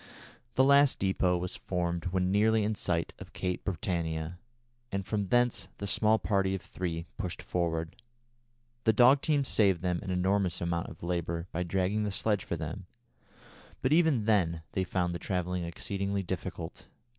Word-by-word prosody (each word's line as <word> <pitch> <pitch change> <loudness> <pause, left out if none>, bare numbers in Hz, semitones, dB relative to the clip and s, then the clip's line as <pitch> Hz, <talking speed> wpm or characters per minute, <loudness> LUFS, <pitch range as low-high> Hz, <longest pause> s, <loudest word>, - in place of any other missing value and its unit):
The 130 - +5
last 140 0 +5
depôt 95 -2 +2
was 90 +1 -3
formed 85 -1 -2
when 90 0 0
nearly 110 +2 +3
in 105 +1 +1
sight 85 -5 -1
of - - -11
Cape 90 -1 -2
Britannia, 85 -2 -2 0.5
and 100 -1 -2
from 105 -2 -1
thence 120 +3 +2
the 100 - -5
small 110 +2 +3
party 95 -2 +1
of 95 - -6
three 85 -2 -4
pushed 90 -4 -4
forward. 85 -2 -2 0.9
The 110 - +5
dog 125 +5 +6
team 150 -3 +2
saved 100 -9 +2
them 90 -1 0
an 95 - -6
enormous 95 0 +1
amount 85 0 -1
of - - -12
labour 85 -1 -2
by 90 - -2
dragging 95 +4 0
the 105 - 0
sledge 105 0 0
for - - -3
them, 85 +5 -6 1.0
but 130 +3 +3
even 155 -9 +4
then 85 -7 +2
they 95 - 0
found 90 -1 -1
the 85 - -4
travelling 90 -1 -2
exceedingly 100 +3 -2
difficult. 90 -2 -5
95 Hz, 165 wpm, -30 LUFS, 85-105 Hz, 1.0 s, dog